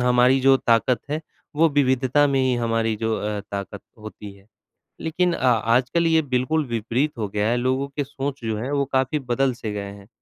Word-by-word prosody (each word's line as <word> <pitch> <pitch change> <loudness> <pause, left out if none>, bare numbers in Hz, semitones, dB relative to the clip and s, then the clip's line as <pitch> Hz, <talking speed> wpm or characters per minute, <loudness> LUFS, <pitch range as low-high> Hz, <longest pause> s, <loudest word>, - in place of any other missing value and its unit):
हमारी 125 +1 +4
जो 135 0 +5
ताकत 120 +1 +2
है, 155 +1 -1 0.4
वो 165 +1 +5
विविधता 135 0 +2
में 140 -1 +1
ही 130 -1 +2
हमारी 115 -1 0
जो 110 0 -1
अ, 105 -1 -3
ताकत 100 0 -5 0.2
होती 105 -1 -10
है। 100 0 -20 0.6
लेकिन 175 +2 0
अ, 130 - -2
आजकल 125 +7 +2
ये 160 0 +4
बिल्कुल 140 +3 0
विपरीत 120 +5 -1
हो 105 -2 -2
गया 105 +1 -1
है, 120 - +2
लोगों 130 +3 0
के 140 +1 -3
सोच 140 -1 -5
जो 110 -1 -1
है 125 +6 -4
वो 140 -1 +1
काफ़ी 130 +3 +1
बदल 135 +1 +2
से 110 -3 -6
गए 100 -1 -5
हैं। 100 0 -14
125 Hz, 200 wpm, -23 LUFS, 110-140 Hz, 0.6 s, जो